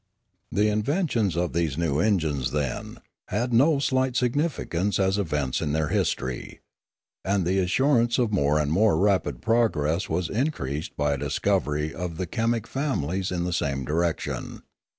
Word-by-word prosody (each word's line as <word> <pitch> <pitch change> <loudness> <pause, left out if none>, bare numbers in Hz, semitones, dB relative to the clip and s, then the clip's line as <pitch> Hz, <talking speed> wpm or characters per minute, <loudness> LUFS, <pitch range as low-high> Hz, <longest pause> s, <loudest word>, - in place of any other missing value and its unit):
The 105 +1 +2
invention 110 - 0
of 90 0 0
these 80 -4 0
new 80 -4 0
engines, 80 - +1
then, 70 -3 -3 0.3
had 120 +5 -1
no 140 +6 +5
slight 130 -2 +1
significance 125 - 0
as 95 +1 +1
events 75 -8 -1
in 75 - -1
their 80 -1 0
history. 65 -1 -2 0.6
And 95 -1 +1
the 95 +2 +1
assurance 120 +5 +2
of 120 -4 +1
more 75 -5 +2
and 75 -1 0
more 105 +6 +3
rapid 90 -10 +1
progress 100 -7 +1
was 85 +1 0
in 130 - 0
creased 70 - -5
by 75 0 +1
a - - -2
discovery 75 +1 0
of 85 +2 -5
the 95 - -2
chemic 115 +4 -1
families 95 - -2
in 90 -1 -1
the 90 0 -2
same 70 -5 -1
direction. 85 +3 -2
90 Hz, 155 wpm, -25 LUFS, 75-115 Hz, 0.6 s, no